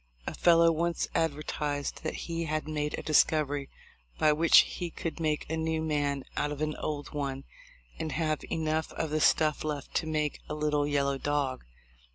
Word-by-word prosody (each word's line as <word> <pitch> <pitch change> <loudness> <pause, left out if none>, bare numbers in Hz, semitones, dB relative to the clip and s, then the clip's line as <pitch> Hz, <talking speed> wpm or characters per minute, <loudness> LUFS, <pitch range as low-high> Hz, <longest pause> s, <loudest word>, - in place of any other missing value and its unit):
A - - -3
fellow 170 -1 +5
once 170 +1 0
advertised 150 -2 -2
that 155 - -3
he 165 0 -2
had 155 -1 -2
made 150 -1 -2
a - - -5
discovery 145 -2 +2 0.5
by 155 -1 +4
which 165 +2 +5 0.2
he 175 -2 -2
could 165 +1 -5
make 155 -2 -1
a 160 - -2
new 160 0 -1
man 145 -3 0
out 145 - 0
of 145 - -5
an 155 0 -1
old 145 -2 -4
one 135 -2 -3 0.6
and 160 -1 -3
have 155 -2 0
enough 160 0 -1
of 160 -2 -3
the 155 0 +1
stuff 155 -1 +3
left 150 -2 -4
to 160 - -1
make 150 -2 -1
a 150 - -2
little 150 -1 +1
yellow 140 -1 +1
dog. 140 -3 -1
150 Hz, 180 wpm, -29 LUFS, 145-160 Hz, 0.6 s, fellow